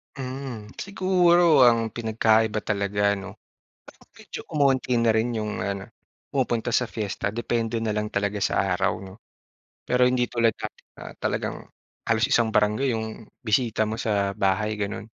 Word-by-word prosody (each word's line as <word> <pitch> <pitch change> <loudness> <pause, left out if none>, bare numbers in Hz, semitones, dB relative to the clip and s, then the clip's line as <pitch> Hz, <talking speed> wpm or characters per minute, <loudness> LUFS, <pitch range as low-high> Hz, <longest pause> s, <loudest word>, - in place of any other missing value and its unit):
Hmm, 130 -5 -6
siguro 175 -7 +4
ang 115 -2 +2
pinagkaiba 110 -1 +1
talaga, 100 0 0
'no, 95 - -8 0.5
parang - - -18
medyo - - -8
umonti 135 -4 +2
na 115 -1 +3
rin 115 +2 0
'yung 105 -1 -3
ano 100 -1 -3 0.5
pumupunta 120 -3 0
sa 125 - +2
fiesta 105 -2 -3
depende 115 +1 -1
na 110 -1 -1
lang 105 0 -1
talaga 100 0 -1
sa 100 - +1
araw, 95 +1 0
'no? 95 0 -11 0.7
Pero 125 0 +3
hindi 125 -1 +2
tulad 115 -1 +2
dati - - -7 0.2
na - - -9
talagang - - -2 0.5
halos 115 0 +3
isang 120 -5 +3
barangay 105 +6 +2
'yong 110 0 -6 0.2
bisita 110 0 +1
mo 110 +1 -3
sa 100 -3 0
bahay 100 +3 +1
gano'n. 100 +1 -3
110 Hz, 150 wpm, -25 LUFS, 105-125 Hz, 0.7 s, siguro